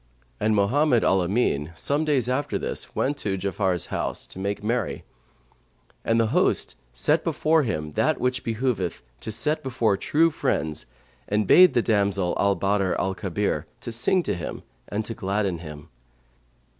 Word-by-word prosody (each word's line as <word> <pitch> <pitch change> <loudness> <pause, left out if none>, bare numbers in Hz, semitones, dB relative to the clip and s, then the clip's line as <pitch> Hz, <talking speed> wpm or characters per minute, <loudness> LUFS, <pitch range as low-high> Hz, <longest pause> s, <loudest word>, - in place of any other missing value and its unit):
And 110 0 +2
Mohammed 120 +5 +3
al 95 0 +3
Amin, 85 -6 0
some 145 - +1
days 135 -6 +2
after 130 +3 -1
this - - -5
went 140 +2 0
to 100 -7 -2
Ja'afar's 95 -2 0
house, - - -2
to - - -10
make 100 +1 -3
merry; 120 +3 -1 1.0
and 115 0 +2
the 115 -1 +2
host - - +2 0.2
set - - +1
before 160 +1 +2
him 75 - -3
that - - +1
which 125 0 0
it - - -24
behoveth 110 - -2 0.2
to 110 - -6
set 150 +8 -1
before 120 -6 0
true 165 +10 +2
friends 80 - -2 0.4
and 105 +1 +1
bade 180 - +7
the 120 - +3
damsel 100 -4 +1
Al 100 0 +3
Badr 100 -1 +1
al 95 - 0
Kabir 100 +2 -2
sing 120 +11 0
to - - -1
him 85 -3 -6 0.2
and 105 +1 -3
gladden 95 -2 -1
him. 75 -3 -10
105 Hz, 155 wpm, -25 LUFS, 95-125 Hz, 1.0 s, bade